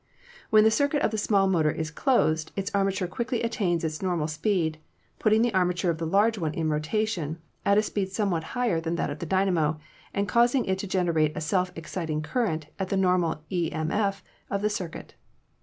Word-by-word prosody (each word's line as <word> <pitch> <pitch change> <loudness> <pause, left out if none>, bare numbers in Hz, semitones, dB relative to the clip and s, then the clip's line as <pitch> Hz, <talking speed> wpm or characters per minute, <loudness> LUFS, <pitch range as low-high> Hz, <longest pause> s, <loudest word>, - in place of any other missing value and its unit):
"When 215 -1 +6
the 220 - +5
circuit 285 +4 +1
of - - +2
the 220 - -1
small 200 -2 +3
motor 165 -5 +2
is 155 0 -3
closed 160 - +1
its 195 -1 -3
arma 195 -1 +2
ture 190 -1 -2
quickly 235 +5 -2
attains 195 -8 0
its 155 -1 -3
normal 175 -5 0
speed, 160 -1 0 0.4
putting 220 +1 +4
the 240 -2 +1
arma 180 -1 +2
ture 180 -1 +1
of 160 - -5
the 165 - -2
large 205 +5 +3
one 155 -3 -2
in 160 -1 0
rotation, 160 0 -1 0.3
at 200 0 +5
a 210 - +4
speed 200 -3 -2
somewhat 195 -6 0
higher 230 -10 +1
than 165 +1 -2
that 170 - -1
of 145 - -6
the 170 - -5
dynamo, 175 -5 +1 0.3
and 200 0 -1
causing 240 +6 +3
it 190 0 -1
to 200 - -4
gen 185 -1 +1
erate 155 -2 +2
a - - 0
self 180 +2 0
exciting 160 -2 -3
current 165 -6 -1
at 190 -1 -2
the 195 - 0
normal 180 -4 +1
e.m.f. 180 +3 -1 0.3
of 200 0 -2
the 210 - +2
circuit. 180 -5 -6
185 Hz, 205 wpm, -27 LUFS, 160-210 Hz, 0.4 s, When